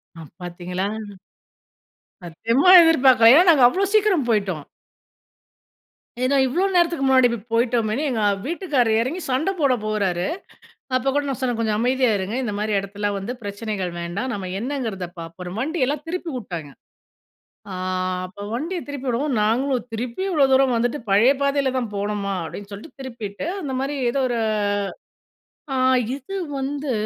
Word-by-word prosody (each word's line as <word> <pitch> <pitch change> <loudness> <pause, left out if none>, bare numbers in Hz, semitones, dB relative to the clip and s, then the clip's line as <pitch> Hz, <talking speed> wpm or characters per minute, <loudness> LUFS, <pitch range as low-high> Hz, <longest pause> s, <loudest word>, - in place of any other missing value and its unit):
ஆ 165 - -10 0.2
பார்த்தீங்களா. 180 +2 -4 1.4
சத்தியமா 230 - +1
எதிர்பார்க்கல 260 -8 +6
ஏன்னா 355 +3 +6
நாங்க 275 -6 +4
அவ்வளோ 385 +10 +1
சீக்கிரம் 390 - +3
போய்ட்டோம். 195 -9 0 1.6
ஏன்னா 275 +2 +2
இவ்ளோ 335 +9 0
நேரத்துக்கு 340 -5 +2
முன்னாடி 260 -2 +5
இப்படி 230 -3 -4
போயிட்டோமேன்னு, 235 +2 +1
எங்க 225 -3 -1 0.2
வீட்டுக்காரர் 280 - +1
எறங்கி 315 +10 -3
சண்ட 270 +9 +1
போட 275 -3 +3
போறாரு. 195 -5 0 0.7
அப்ப 255 +1 0
கூட 290 - +2
நான் 265 - -3
சொன்னேன் 245 -3 0
"கொஞ்சம் 215 -2 0
அமைதியா 255 +1 +2
இருங்க 195 +5 -3
இந்த 210 - -3
மாதிரி 210 0 -1
எடத்துலலாம் 200 +1 -3
வந்து 215 +6 -5
பிரச்சனைகள் 205 -3 -4
வேண்டாம்." 195 +10 -3
நம்ம 190 -4 -5
என்னங்கிறத 230 -8 -3
பார்ப்போம். 165 - -6
அப்றோம் 180 +4 -7
வண்டியெல்லாம் 290 -1 -1
திருப்பி 345 -1 -4
விட்டாங்க. 170 - -7 1.0
ஆ - - -5 0.5
அப்போ 185 +2 -11
வண்டிய 325 +10 -3
திருப்பி 280 -2 -6
விடவும்ம் 250 +1 0
நாங்களும் 250 +2 0
திருப்பி 235 +8 -4
இவ்வளோ 300 -6 +4
தூரம் 265 -2 +4
வந்துட்டு 245 +5 0
பழைய 215 +7 +5
பாதையில 280 -1 +1
தான் 240 -3 -2
போகணுமா? 200 -1 -2
அப்டின்னு 200 +5 -8
சொல்லிட்டு 210 +9 -11
திருப்பிவிட்டு 230 -2 -6 0.2
அந்த 285 -5 -4
மாதிரி 280 +2 -2 0.2
ஏதோ 275 - -1
ஒரு 240 -1 -1 1.4
ஆ - - 0 0.4
இது 285 +8 -9 0.2
வந்து 280 +1 -3
245 Hz, 145 wpm, -22 LUFS, 205-280 Hz, 1.6 s, எதிர்பார்க்கல